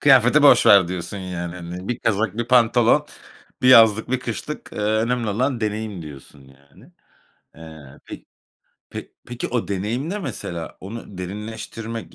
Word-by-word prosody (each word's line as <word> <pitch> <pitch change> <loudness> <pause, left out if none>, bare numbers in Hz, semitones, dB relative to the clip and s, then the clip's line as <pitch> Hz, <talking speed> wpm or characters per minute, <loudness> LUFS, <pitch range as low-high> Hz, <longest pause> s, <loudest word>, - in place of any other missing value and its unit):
Kıyafeti - - +5
boş - - +6
ver 100 -4 +7
diyorsun, 90 +2 -5
yani, 90 -2 -5
hani, 90 +1 -8
bir 120 - -2
kazak, 110 +1 -1
bir 120 0 -2
pantolon, 120 -1 +4 0.6
bir 125 - +4
yazlık, 110 -2 +6
bir 130 -1 0
kışlık, 130 +5 -6
eee, - - -8
önemli 110 +3 0
olan 125 +4 -1
deneyim 105 -3 -3
diyorsun, 70 -2 -12
yani. 70 +1 -21 0.6
Eee, 80 -4 -13
pe - - -10 0.7
pe - - -7 0.2
peki, 120 0 -5
o 120 -2 -2
deneyim 110 - -3
ne, 210 - -3
mesela, 95 - -6
onu 100 -1 -9
derinleştirmek, 110 +4 -7
105 Hz, 150 wpm, -22 LUFS, 90-120 Hz, 0.7 s, ver